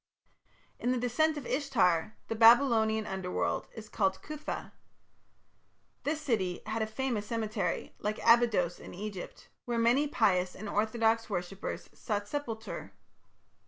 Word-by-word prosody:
In 245 - -1
the 255 - +1
"Descent 295 +6 +1
of 285 - -6
Ishtar" 220 - +1
the - - -2
Babylonian 225 -1 +5
Underworld 190 -2 -2
is 220 -1 -8
called 190 -3 0
Cuthah. 305 0 -5 1.3
This 300 +2 0
city 210 - -1
had 220 +1 -2
a 220 - 0
famous 220 -2 -2
cemetery, 215 -6 -2
like 210 +1 -2
Abydos 230 -7 +4
in - - -10
Egypt, 200 -1 -7 0.2
where 240 -1 -1
many 240 +6 +3
pious 185 -9 +2
and 215 - -7
orthodox 225 +2 +1
worshippers 190 0 -4
sought 205 -2 -3
sepulture. 230 -5 -5
220 Hz, 125 wpm, -31 LUFS, 205-245 Hz, 1.3 s, Babylonian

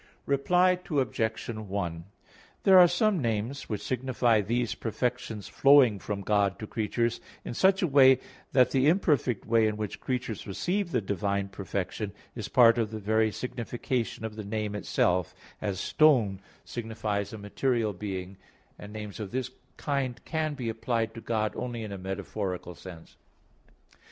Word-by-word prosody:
Reply 180 +6 +3
Obj. 120 -7 -1
1: 100 -7 -4 0.6
There 190 -1 +8
are 175 - +9
some 180 +1 +1
names 115 +3 -2
which 105 -3 -3
signify 125 -3 +1
these 120 +3 -1
perfections 115 -2 -3
flowing 135 -7 +5
from 100 0 -4
God 100 -1 +1
to 110 - -6
creatures 115 +2 -1 0.2
in - - -4
such 190 - +3
a - - +3
way 135 -3 +7 0.3
that 125 -2 +4
the 135 +1 +3
imperfect 150 - +2
way 115 -1 +3
in 105 -1 -2
which 105 -2 -4
creatures 125 -5 -3
receive 180 - -1
the 165 - 0
divine 100 0 -1
perfection 100 +1 -4 0.2
is 115 -4 -5
part 120 -1 +6
of 110 -2 0
the 110 - -5
very 110 +1 +1
signification 120 +1 -3
of 110 -1 -5
the 110 - -5
name 105 0 -3
itself 90 -3 0 0.3
as 100 -3 -2
"stone" 120 -12 +3 0.3
signifies 110 -3 -3
a 110 - -7
material 110 +1 -1
being, 95 -1 -5 0.4
and 105 - -9
names 105 -1 -7
of 105 -3 -4
this 125 +1 -3 0.3
kind 135 -4 -2
can 155 -2 -1
be 125 -4 -4
applied 115 0 -1
to 115 - -8
God 110 -2 -1
only 120 -2 -4
in 105 - -6
a 100 - -6
metaphorical 95 -1 -4
sense. 85 -1 -12
110 Hz, 155 wpm, -28 LUFS, 100-130 Hz, 0.6 s, are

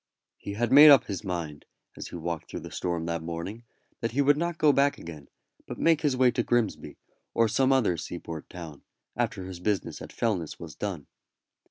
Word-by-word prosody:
He 100 - -6
had 120 +3 -1
made 145 +3 +10
up 140 -2 +8
his 100 0 -5
mind, 85 -6 -5 0.3
as - - -7
he - - -9
walked 85 -1 -4
through - - -6
the - - -9
storm 85 -2 -2
that 85 0 -2
morning, 85 +8 -6 0.3
that 115 -1 -3
he 140 - +2
would 145 +1 +5
not 170 +2 -2
go 150 -2 +4
back 140 +1 +2
again, 75 -4 -10 0.4
but - - -6
make 165 -2 +3
his 140 -4 +1
way 125 -1 +5
to 120 - 0
Grimsby, 120 -3 -1 0.4
or 115 - +4
some 130 +5 +2
other 120 -10 +2
seaport 80 -3 -7
town, 80 -5 -9 0.3
after 95 - -2
his 95 -1 -8
business 100 +1 -2
at - - -8
Fellness 95 -9 -2
was 85 -3 -9
done. 90 -7 -5
100 Hz, 200 wpm, -27 LUFS, 85-130 Hz, 0.4 s, made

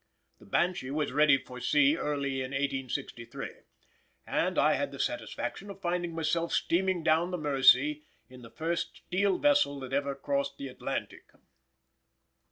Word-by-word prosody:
The - - -17
Banshee 175 - 0
was 150 0 -1
ready 145 0 +5
for 125 -1 -10
sea 145 +3 +4
early 140 -4 -2
in 130 +1 -5
1863, 135 -4 -3 0.7
and - - 0
I - - +4
had - - -1
the - - -8
satisfaction 195 +12 -3
of 195 -1 -9
finding 175 -2 -2
myself 165 +1 0
steaming 180 0 +1
down 160 +2 +3
the 180 - -2
Mersey 140 0 +4 0.3
in 125 0 -14
the 115 - -11
first 165 +6 -3
steel 190 +1 +1
vessel 290 - +3
that 130 0 -7
ever 140 0 0
crossed 140 0 -2
the 140 - -6
Atlantic. 125 - -5
145 Hz, 150 wpm, -30 LUFS, 135-170 Hz, 0.7 s, ready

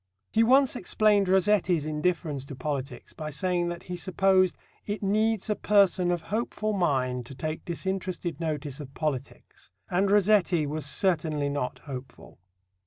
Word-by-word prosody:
He 225 - +3
once 260 +3 +4
explained 205 0 +2
Rossetti's 185 -4 +3
indifference 155 -2 -1
to 140 - -8
politics 140 0 -5
by 155 -1 -6
saying 175 +2 -1
that 175 0 -6
he 180 - -5
supposed 185 0 +2 0.3
"it 205 0 -3
needs 215 +1 +1
a 210 - 0
person 195 -4 +3
of 175 -2 -1
hopeful 215 -1 -1
mind 130 -9 0
to 135 - -9
take 155 +3 -4
disinterested 185 -1 -3
notice 150 -4 -3
of 135 -2 -9
politics, 140 - -5 0.2
and 190 +3 +2
Rossetti 200 -5 +3
was 150 0 -3
certainly 155 -4 +1
not 140 -3 -3
hopeful." 130 -7 -9
175 Hz, 145 wpm, -27 LUFS, 150-195 Hz, 0.3 s, once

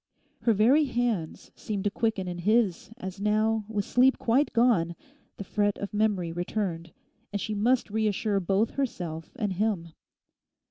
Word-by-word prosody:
Her 230 - +3
very 250 +9 +4
hands 235 - -2
seemed 205 -3 -4
to 205 - 0
quicken 220 -4 -1
in 175 -1 -4
his 210 -1 +1
as 190 -4 -7
now, 215 +1 +1
with 210 -2 -1
sleep 260 +2 +4
quite 260 +6 +2
gone, 220 -9 +2 0.4
the - - -5
fret 205 +1 0
of 200 - -6
memory 205 -5 +1
returned, 175 -1 -3 0.4
and 205 - -2
she 215 - -3
must 230 +2 +1
reassure 215 -1 0
both 195 +4 +1
herself 175 - -4
and 205 -4 -1
him. 190 -4 -1
210 Hz, 150 wpm, -27 LUFS, 185-225 Hz, 0.4 s, very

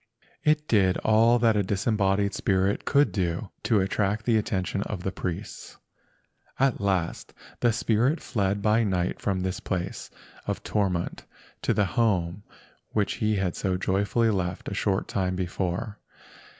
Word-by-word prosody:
It 150 0 +2
did 95 -4 +3
all 115 +2 +5
that 115 -2 +3
a 105 - +3
disembodied 100 0 +1
spirit 95 0 0
could 145 +1 +3
do 90 0 -2
to 110 -4 +2
attract 105 +2 0
the 115 - +3
attention 100 -2 -1
of 100 -3 -4
the 95 - -1
priests. 90 -2 -6 0.8
At 135 -5 +2
last 95 -4 -1 0.2
the 120 - +3
spirit 120 +7 +1
fled 100 -4 -1
by 110 +2 +3
night 90 -4 -1
from 95 -2 0
this 95 0 -2
place 95 0 -4 0.4
of - - -3
torment 95 -5 -1 0.3
to - - +1
the 105 - +2
home 95 -4 0 0.5
which 105 -2 0
he 110 0 +2
had 95 -3 -1
so 95 -2 -1
joyfully 100 +5 +1
left 90 -3 -2
a - - -5
short 100 -1 0
time 95 -1 -1
before. 95 +4 -3
100 Hz, 150 wpm, -26 LUFS, 95-110 Hz, 0.8 s, all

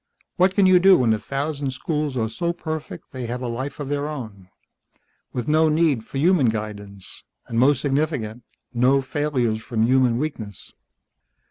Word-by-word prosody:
What 185 +1 +3
can 200 - +4
you 185 -1 +6
do 190 +1 +7
when 115 -3 +3
a 110 - -1
thousand 140 +2 -3
schools 150 0 -2
are 110 -2 0
so 170 +9 -2
perfect 160 -2 -6
they 130 -2 -5
have 125 +2 -4
a - - -2
life 130 +5 -4
of 145 - -4
their 145 +1 -1
own, 110 -10 -8 0.8
with 125 -2 -4
no 155 +1 +4
need 155 -7 +2
for 135 - -7
human 155 -4 +4
guidance, 100 -3 -6 0.2
and, 115 - -2
most 135 +1 +4
significant, 135 -6 -1 0.3
no 130 +3 +3
failures 130 -6 -1
from 110 -1 -1
human 125 -1 +3
weakness? 115 - -5
135 Hz, 165 wpm, -23 LUFS, 115-150 Hz, 0.8 s, do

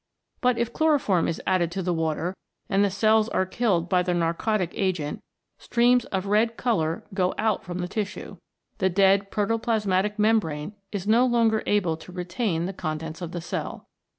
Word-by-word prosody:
But 250 -3 +2
if 235 0 -1
chloroform 285 - +2
is 165 - -2
added 180 -3 +1
to 190 - -3
the 180 0 0
water 165 +2 -1 0.3
and 195 0 +2
the 200 - +3
cells 215 +3 +3
are 190 - +1
killed 185 -4 0
by 180 -1 +3
the 180 0 0
narcotic 175 +3 0
agent, 175 -7 -1 0.4
streams 245 +1 +3
of 190 0 -3
red 220 +3 +2
colour 165 -10 0
go 185 -1 0
out 215 -2 0
from 175 0 -6
the 180 0 -2
tissue. 205 +1 -5 0.4
The 190 - +2
dead 195 +1 +3
protoplasmatic 210 -2 0
membrane 210 -6 +1 0.2
is 200 -3 -4
no 230 +4 +4
longer 230 -3 +2
able 180 -6 +1
to 170 - -12
retain 180 0 -2
the 190 - -4
contents 160 0 -5
of 170 -2 -5
the 175 - -4
cell. 165 - -5
195 Hz, 175 wpm, -25 LUFS, 175-220 Hz, 0.4 s, no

